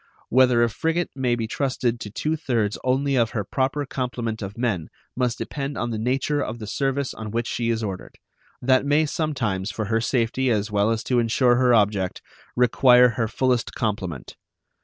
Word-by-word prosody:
Whether 125 -1 +4
a 120 - +2
frigate 165 +7 -1
may 125 -3 +1
be 115 -1 -2
trusted 125 -1 -1
to 105 - -6
two 155 +9 -2
thirds 115 -9 -1
only 135 +2 +1
of 115 -3 +2
her 105 - 0
proper 135 +7 -1
complement 120 -4 -3
of 100 +1 -6
men 110 -10 -1 0.3
must 125 -2 0
depend 140 0 -4
on 120 - -2
the 110 - -3
nature 135 +5 0
of 115 -2 -4
the 110 - -7
service 135 +4 -1
on 110 -1 -7
which 115 +2 -2
she 115 0 -2
is 115 -1 0
ordered; 95 -3 -6 0.5
that 130 +1 +4
may 145 +2 +3
sometimes, 130 - -2
for 110 - -3
her 115 +2 0
safety 125 +2 0
as 105 -2 0
well 105 +1 +2
as 115 -1 -1
to 125 -2 +1
insure 120 +1 +3
her 125 -1 +4
object, 100 -4 +1 0.3
require 125 0 +5
her 115 0 -1
fullest 125 +1 0
complement. 95 - -3
120 Hz, 185 wpm, -23 LUFS, 110-130 Hz, 0.5 s, require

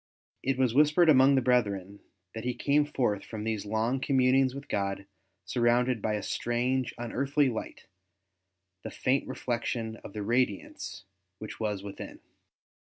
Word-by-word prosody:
It 135 -1 0
was 130 -3 +2
whispered 150 +4 +5
among 135 -1 +6
the 130 - +2
brethren 100 -6 0 0.3
that 110 - -6
he 125 0 -2
came 145 +3 +2
forth 110 -8 0
from 110 -2 -7
these 110 -2 -3
long 110 +5 0
communings 130 0 +3
with 140 +1 -8
God 100 -3 -2 0.4
surrounded 120 -1 +2
by 105 +1 0
a 105 - -4
strange, 125 +3 -1
unearthly 135 +4 +1
light, 110 - -6 1.0
the - - -6
faint 135 +2 0
reflec 120 -2 -3
tion 115 -2 -3
of 100 - -11
the 105 - -4
radiance 120 -4 -1 0.3
which 110 - -8
was 105 -3 -2
within. 100 -1 -8
120 Hz, 150 wpm, -29 LUFS, 110-130 Hz, 1.0 s, among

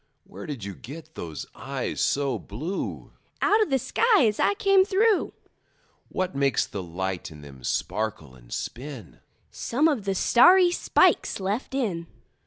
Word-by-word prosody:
Where 100 +2 -10
did 135 -8 -6
you 100 0 -5
get 155 - -11
those 80 - -6
eyes - - -4
so 135 -5 +1
blue? 155 - -5 0.3
Out 425 +2 +3
of 425 - +1
the 270 - +3
sky 430 - +3
as 210 -1 0
I 405 - +3
came 395 -3 +4
through. 405 +2 +2 0.8
What 185 0 -2
makes 140 -1 +2
the 100 - -6
light 90 +1 -4
in 75 -2 -12
them 70 -3 -13
sparkle 105 - -2
and - - -18
spin? 125 - -6 0.3
Some 285 +7 +1
of 270 -10 0
the 195 -1 0
starry 355 - +6
spikes 350 - +2
left 205 +7 -3
in. 185 -11 -2
165 Hz, 155 wpm, -26 LUFS, -, 0.8 s, starry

